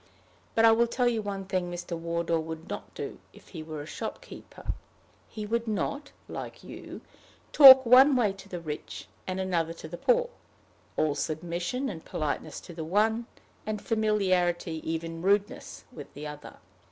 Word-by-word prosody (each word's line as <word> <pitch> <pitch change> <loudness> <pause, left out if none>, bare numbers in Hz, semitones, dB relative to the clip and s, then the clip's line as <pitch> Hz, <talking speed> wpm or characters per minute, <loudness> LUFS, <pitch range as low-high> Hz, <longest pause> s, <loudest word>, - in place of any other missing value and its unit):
But 225 - +5
I 225 - +8
will 235 +1 +4
tell 245 +1 +1
you 230 -2 +1
one 200 -2 -5
thing 185 -2 -1
Mr. 175 0 -5
Wardour 170 0 -1
would 160 0 -6
not - - -6
do - - -6
if - - -17
he 165 - -7
were 155 -2 -6
a - - -10
shopkeeper: - - -7 0.6
he 215 -1 -6
would 230 +2 -1
not, 280 +7 -2 0.2
like - - -7
you, - - -9 0.5
talk 265 -3 +10
one 260 +4 +7
way 220 -6 +2
to 195 0 -14
the 180 - -5
rich, 155 -3 -7 0.2
and 185 0 -2
another 170 -3 0
way - - -20
to - - -8
the - - -7
poor - - +2 0.7
all 155 -2 +2
submission 175 - -3
and 165 -8 -6
politeness 150 -2 -3
to 175 - -11
the 160 -1 -5
one, 220 +7 +1 0.4
and 215 -1 -3
familiarity, 185 -7 0
even 165 0 -4
to 185 - -2
rudeness, 205 +1 0
with - - -10
the 145 +2 -7
other! 150 0 -9
185 Hz, 175 wpm, -28 LUFS, 165-225 Hz, 0.7 s, talk